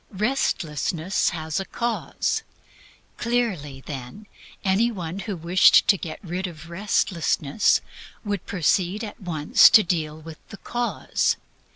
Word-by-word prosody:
Restlessness 185 - 0
has 160 -2 -3
a 195 - -4
cause. 235 +3 -2 0.8
Clearly, 200 - -2
then, 135 +10 -8 0.4
any 205 +5 +2
one 180 -3 -5
who 205 -1 -4
wished 175 +3 +5
to 200 - +7
get 170 -4 -6
rid 185 +1 -3
of 170 0 -11
restlessness 170 -3 +1 0.4
would 205 -3 -3
proceed 185 +3 0
at 210 -1 -8
once 160 -5 +5
to 215 - +7
deal 160 -3 -2
with 160 0 -11
the 215 - -9
cause. 240 +4 -1
180 Hz, 125 wpm, -24 LUFS, 160-210 Hz, 0.8 s, to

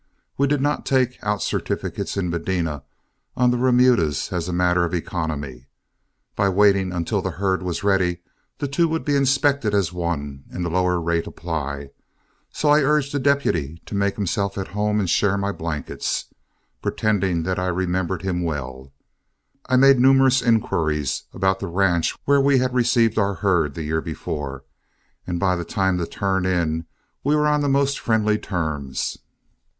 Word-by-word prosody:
We 140 - +2
did 145 -1 +1
not 145 +1 0
take 130 -2 +1
out 105 -1 -1
certificates - - -3
in 90 -3 -1
Medina 85 -3 -2 0.6
on 125 -1 +4
the 125 - 0
remudas 125 - +2
as 85 -1 -2
a - - -2
matter 90 0 +2
of 85 +1 -1
economy. 75 -7 -4 0.7
By 100 - +2
waiting 100 -1 +3
until 85 -2 -1
the - - -2
herd 95 -1 0
was 90 +1 -3
ready, 95 -3 +1 0.3
the 145 - -2
two 150 +5 +2
would 160 0 -2
be 145 - +1
inspected 140 -4 +2
as 90 -4 +1
one, 75 -6 -4
and 90 - -4
the 85 - -2
lower 90 0 +1
rate 85 0 -1
apply. 70 -4 -5 0.6
So 150 - -1
I 150 +1 +6
urged 145 0 +1
the 145 - 0
deputy 85 - 0
to - - -9
make 100 0 0
himself 100 0 -2
at 95 - -4
home 105 +1 0
and 100 - 0
share 100 +3 +2
my 100 0 -1
blankets. 80 -6 -3 0.6
Pretending 95 -6 0
that 90 +2 -1
I 90 - -1
remembered 90 0 -1
him 90 -2 -1
well, 70 -5 -5 0.8
I 130 - +2
made 135 0 +6
numerous 130 0 +5
inquiries 80 - 0
about 95 0 0
the - - -4
ranch 85 -1 +1
where 140 0 +4
we 140 -1 +4
received 120 -3 +2
our 100 -1 +1
herd 85 -6 +1
the 80 - -4
year 80 +1 -1
before, 70 -4 -5 0.6
and 90 -1 -2
by 95 -1 +2
the 85 - -3
time 95 +1 0
to 85 - -2
turn 95 -2 -1
in, 80 -3 0 0.4
we 145 +2 +2
were 150 0 +2
on 150 0 +2
the 145 - +1
most 140 0 +1
friendly 110 -2 +1
terms. 80 -8 -3
95 Hz, 170 wpm, -22 LUFS, 85-125 Hz, 0.8 s, I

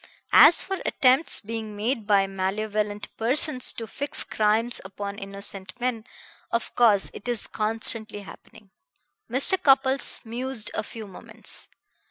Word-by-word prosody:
As 315 +3 +8
for 385 0 -4
attempts 260 +5 +3
being 220 -1 -6
made 220 +1 -3
by 200 -2 +3
malevolent 205 +2 -3
persons 255 +3 +1
to 230 - -7
fix 280 +6 -3
crimes 220 +3 0
upon 200 +1 -7
innocent 195 0 -7
men, 240 -3 -3 0.4
of 235 - -3
course 215 -5 +3
it 205 - -10
is 240 -3 0
constantly 220 -1 -2
happening." 200 0 -15 0.6
Mr. 280 +10 +5
Cupples 270 -2 +4
mused 235 -1 -4
a - - -2
few 220 +1 -9
moments. 190 -3 -4
220 Hz, 130 wpm, -24 LUFS, 205-250 Hz, 0.6 s, As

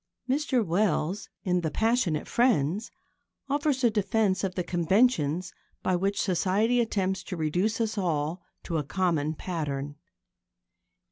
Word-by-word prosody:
Mr 265 -3 +1
Wells, 185 +1 0
in 180 -1 +1
The 160 - -1
Passionate 220 -5 +1
Friends, 210 - +1 0.6
offers 285 -1 0
a 235 - +5
defence 205 -2 +1
of 185 -2 -2
the 180 - -1
conventions 175 - +1 0.3
by 185 - +2
which 195 +3 0
Society 205 +6 +2
attempts 190 -4 -1
to 180 - -5
reduce 180 +9 0
us 220 -2 -1
all 165 -1 -1 0.2
to 165 -3 -1
a - - -2
common 160 -2 0
pattern. 145 -5 -4
185 Hz, 130 wpm, -27 LUFS, 165-220 Hz, 0.6 s, a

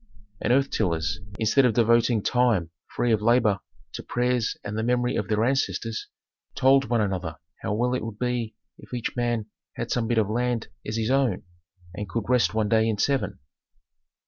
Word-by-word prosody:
And - - +1
earth 135 +2 +3
tillers, 90 -1 0 0.2
instead 110 +5 +3
of 120 -4 +3
devoting 115 -1 +3
time 115 -10 +2 0.2
free 120 - 0
of 110 -2 +2
labor 110 -3 +3 0.3
to - - -5
prayers 125 -2 0
and 100 +1 -5
the 110 - -1
memory 125 +1 +1
of - - -1
their 110 0 +1
ancestors, 120 -3 -1 0.5
told 135 +1 +4
one 120 -1 +1
another 90 -6 -2 0.2
how 105 - -1
well 125 +3 +1
it 125 - -1
would 110 -2 -6
be 120 -2 -2 0.2
if - - -8
each 120 - -3
man 120 -3 0 0.3
had - - -5
some 120 -2 0
bit 120 0 0
of 110 -3 +3
land 120 +1 -1 0.2
as 110 +1 -2
his 115 +2 0
own, 135 -8 +1 0.5
and 100 +1 -6
could 115 +2 -3
rest 125 -3 +2
one 110 -1 +1
day 110 0 +3
in 110 - -1
seven. 135 +6 0
115 Hz, 185 wpm, -25 LUFS, 105-125 Hz, 0.5 s, told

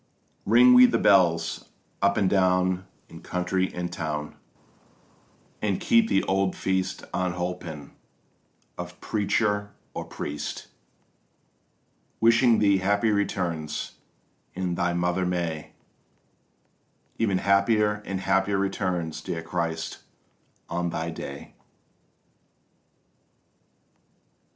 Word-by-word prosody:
Ring 125 +4 +7
we 125 0 +9
the - - +1
bells - - +3 0.3
up 100 0 +3
and 95 - +3
down 95 -1 +2 0.2
in 80 - -12
country 90 +1 -1
and 90 0 -4
town, 75 -3 -4 1.3
And 100 -3 0
keep 230 -1 +3
the 95 - +2
old 95 0 0
feast 95 -1 -1
unholpen 90 -5 -3 0.9
of 90 0 -7
preacher 105 -1 -1 0.2
or - - -5
priest, 75 0 -6 1.5
Wishing 115 +1 +5
thee 100 -2 +3
happy 100 +3 +2
returns, 85 -7 -2 0.6
and 90 -1 -2
thy 90 0 0
Mother 90 +1 0
May, 85 -3 -3 1.5
Ever 105 -4 +1
happier 105 +2 +2
and 95 -1 -4
happier 95 +1 +1
returns, 90 -4 -2
dear 80 -1 -4
CHRIST, 80 -1 -3 0.7
of 85 +1 -2
thy 85 0 -3
day! 70 -3 -8
95 Hz, 95 wpm, -26 LUFS, 85-100 Hz, 1.5 s, we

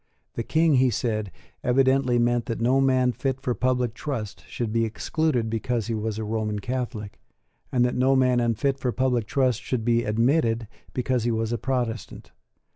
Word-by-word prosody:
The - - -3
King, 160 +3 +3
he 130 0 +4
said, 110 -3 -2 0.3
evidently 130 0 +3
meant 120 0 +1
that 115 - -3
no 130 +4 +3
man 130 -2 +3
fit 135 +1 -2
for 125 -2 -1
public 125 0 0
trust 110 - -5
should 115 0 -3
be 115 0 +2
excluded 120 +2 0
because 115 0 -1
he 115 - -2
was 110 -1 -2
a 110 - -3
Roman 105 -1 -2
Catholic, 120 -2 -4 0.5
and 125 -1 +3
that 125 - 0
no 130 +2 +3
man 125 -2 +3
unfit 120 +4 0
for 125 - 0
public 125 -3 0
trust 130 -4 +1
should 120 -4 -2
be 120 0 +3
admitted 115 0 +1 0.3
because 125 -1 0
he 120 - +1
was 115 0 -1
a 120 - -2
Protestant. 120 -4 -3
120 Hz, 180 wpm, -25 LUFS, 115-130 Hz, 0.5 s, he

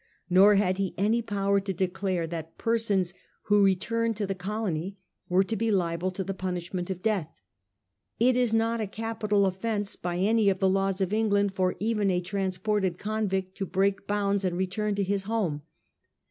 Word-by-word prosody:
Nor 195 +3 +7
had 190 -1 +1
he 195 -2 -1
any 220 +4 +2
power 200 -2 +1
to 195 0 -3
declare 185 -1 -1
that 165 -1 -7
persons 210 -6 0 0.3
who 205 -1 +4
returned 225 +4 +1
to 210 - -1
the 195 - -2
colony 190 -1 -3 0.3
were 185 +2 +4
to 220 +3 -3
be 225 +2 0
liable 175 -2 0
to 190 - -3
the 195 - -3
punishment 180 -1 -4
of 185 -1 -5
death. 205 -8 0 0.9
It 245 +2 +4
is 245 -2 +2
not 225 +1 +1
a 215 - -2
capital 215 -1 0
offence 205 +2 -2
by 175 0 -3
any 210 +2 +3
of 190 - +1
the 190 - +2
laws 195 0 +1
of 190 +1 0
Eng 220 0 +2
land 200 -1 +2
for 185 -1 0
even 210 -2 +1
a 180 -1 +2
transported 190 0 -1
convict 195 -3 -2
to 195 - -2
break 195 +2 0
bounds 200 -1 0
and 180 -2 -1
return 200 +3 -1
to 200 - 0
his 195 0 -1
home. 195 -9 -1
195 Hz, 185 wpm, -27 LUFS, 185-210 Hz, 0.9 s, Nor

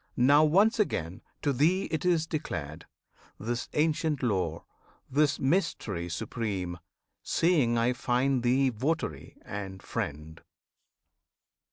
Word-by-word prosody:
Now 140 +5 +6
once 200 +9 +4
again 90 - -1 0.2
to 145 - +2
thee 165 +9 +2
it 160 - -1
is 170 -3 +3
declared 80 - -5 0.5
This 120 +3 -3
ancient 150 -2 +1
lore, 90 -8 -1 0.5
this 145 +1 +3
mystery 110 - 0
supreme 90 0 -3 0.4
Seeing 145 -9 +2
I 115 +2 +2
find 125 +1 +1
thee 130 +3 +3
votary 125 - -3
and 95 -2 -6
friend. 75 +2 -5
125 Hz, 110 wpm, -29 LUFS, 95-155 Hz, 0.5 s, Now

